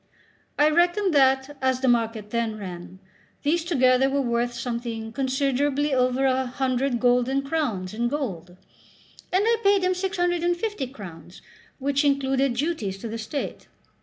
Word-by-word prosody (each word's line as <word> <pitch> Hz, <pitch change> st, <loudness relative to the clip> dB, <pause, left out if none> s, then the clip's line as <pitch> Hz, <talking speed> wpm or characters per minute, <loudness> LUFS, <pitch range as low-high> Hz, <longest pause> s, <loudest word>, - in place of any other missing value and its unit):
I 300 Hz, +1 st, +4 dB
reckoned 350 Hz, +3 st, +2 dB
that, 265 Hz, 0 st, +3 dB
as 260 Hz, -1 st, +1 dB
the 265 Hz, -, +1 dB
market 225 Hz, -3 st, 0 dB
then 230 Hz, -2 st, -1 dB
ran, 180 Hz, -2 st, -8 dB, 0.5 s
these 320 Hz, +3 st, +1 dB
together 265 Hz, -5 st, +3 dB
were 280 Hz, +1 st, 0 dB
worth 240 Hz, 0 st, 0 dB
something 235 Hz, -2 st, -4 dB
considerably 275 Hz, +2 st, 0 dB
over 255 Hz, +1 st, +2 dB
a 260 Hz, 0 st, +1 dB
hundred 255 Hz, 0 st, -1 dB
golden 250 Hz, +2 st, +2 dB
crowns 255 Hz, -, -2 dB
in 235 Hz, +2 st, 0 dB
gold; 185 Hz, -, -4 dB, 0.7 s
and 375 Hz, +3 st, +3 dB
I 460 Hz, 0 st, +3 dB
paid 400 Hz, -1 st, +4 dB
him 370 Hz, 0 st, +2 dB
650 355 Hz, -, -1 dB
crowns, 185 Hz, -8 st, -11 dB, 0.3 s
which 280 Hz, +1 st, 0 dB
included 270 Hz, -2 st, +1 dB
duties 240 Hz, -, -2 dB
to 215 Hz, -, -7 dB
the 225 Hz, +1 st, -5 dB
state. 225 Hz, +6 st, -5 dB
265 Hz, 140 wpm, -25 LUFS, 235-295 Hz, 0.7 s, I